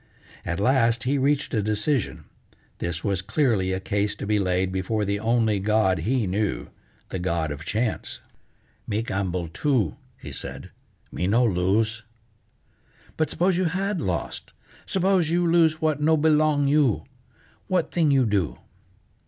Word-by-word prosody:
At 85 +1 -3
last 115 0 +2
he 140 +2 +1
reached 145 +2 +1
a 110 - +2
decision: 110 +5 -1 0.6
this 85 -1 -3
was 100 -3 0
clearly 110 -3 +1
a 95 - -1
case 100 +1 -1
to - - -6
be 105 0 +1
laid 95 -1 0
before 100 +3 -1
the 100 +1 -1
only 110 -2 +2
god 105 -2 +2
be 125 0 +1
knew, 100 +3 -2 0.4
the 95 - -4
god 85 -4 -1
of 75 +1 -6
Chance. 110 +1 -2 0.7
"Me 105 +2 -1
gamble 95 -5 -2
too," 125 - 0 0.2
he - - -8
said; - - -7 0.4
"me 90 - -2
no 115 +5 +3
lose." 110 +3 +1 1.1
"But 155 - 0
s'pose 180 0 +1
you 185 - +1
had 185 +2 -1
lost? 85 - -4 0.3
S'pose 190 -3 +2
you 175 +1 +2
lose 165 -2 +3
what 155 -2 +1
no 160 +1 +4
belong 150 -2 +3
you? 140 -5 +2 0.6
What 180 -3 0
thing 165 -3 +2
you 135 -3 +4
do?" 100 -7 0
110 Hz, 150 wpm, -25 LUFS, 95-150 Hz, 1.1 s, no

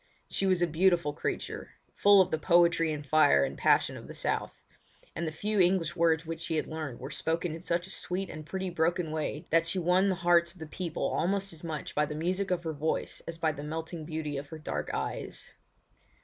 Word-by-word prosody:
She 195 - 0
was 185 -2 +3
a - - +6
beautiful 170 -2 +2
creature, - - -4 0.2
full 200 -1 +6
of 185 - +1
the 160 - 0
poetry 170 -1 +4
and 150 -1 -4
fire 140 - +5
and - - -5
passion - - +3
of - - -9
the - - -8
South; - - -1 0.6
and 170 - -2
the - - -2
few 210 +6 -1
English 175 -2 +3
words 165 -1 +2
which 165 0 -5
she 165 -1 -2
had 155 - 0
learned 155 -6 -5
were 135 +3 -7
spoken 165 +3 -1
in 165 - -7
such 170 -1 -1
a 190 - -9
sweet 190 +1 -2
and 155 - -8
pretty 190 +3 -4
broken 170 0 0
way 155 -1 -3
that 165 +1 +4
she 190 - -1
won 180 +2 +3
the 190 - +1
hearts 170 -1 +3
of - - -20
the 160 - -7
people 165 +1 -4
almost 195 +1 0
as 160 - -11
much 155 -4 -5
by 150 0 +1
the 150 - -5
music 185 +5 -1
of 180 -1 0
her 160 -1 -2
voice 155 +2 -2
as 165 - -5
by 160 -1 +1
the 145 -1 -7
melting 160 +2 -5
beauty 155 -2 -4
of 140 +1 -5
her 160 - -8
dark 155 - -4
eyes. - - -4
165 Hz, 225 wpm, -30 LUFS, 155-180 Hz, 0.6 s, a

